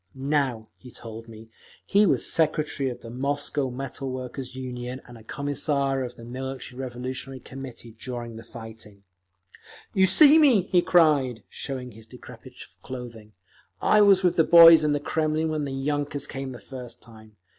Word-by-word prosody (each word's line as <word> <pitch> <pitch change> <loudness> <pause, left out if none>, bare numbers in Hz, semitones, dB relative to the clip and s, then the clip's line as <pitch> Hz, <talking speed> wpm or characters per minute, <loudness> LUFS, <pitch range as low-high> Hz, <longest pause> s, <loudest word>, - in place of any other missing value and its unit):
Now, 135 -5 -1
he 125 - -14
told 115 -1 -10
me, 110 0 -13 0.3
he 205 +1 +4
was - - +1
secretary 155 -4 0
of 125 - -8
the 115 - -10
Moscow 140 +1 -2
Metal 135 +1 -6
Workers' 130 0 -6
Union, 125 -1 -6
and 120 - -13
a 115 - -13
Commissar 140 0 -1
of 125 -1 -7
the 115 - -12
Military 130 +1 -7
Revolutionary 130 +1 -6
Committee 130 -2 -10
during 120 0 -7
the 115 - -10
fighting…. 110 -3 -12 0.9
"You 190 0 +4
see 305 - +7
me!" 260 - +5
he 180 -1 +2
cried, 145 -10 +3
showing 130 -3 -6
his 110 0 -15
decrepit 125 +1 -13 0.3
clothing. 115 -4 -9 0.5
"I 210 - +4
was 195 -2 +5
with 180 - +2
the 160 - +6
boys 165 -1 +9
in 150 -1 +2
the 145 - 0
Kremlin 155 +1 -1
when 155 -2 -2
the 140 - -5
yunkers 145 +1 -2
came 135 0 -6
the 125 - -9
first 125 -3 -10
time. 110 -2 -16
130 Hz, 165 wpm, -25 LUFS, 120-145 Hz, 0.9 s, boys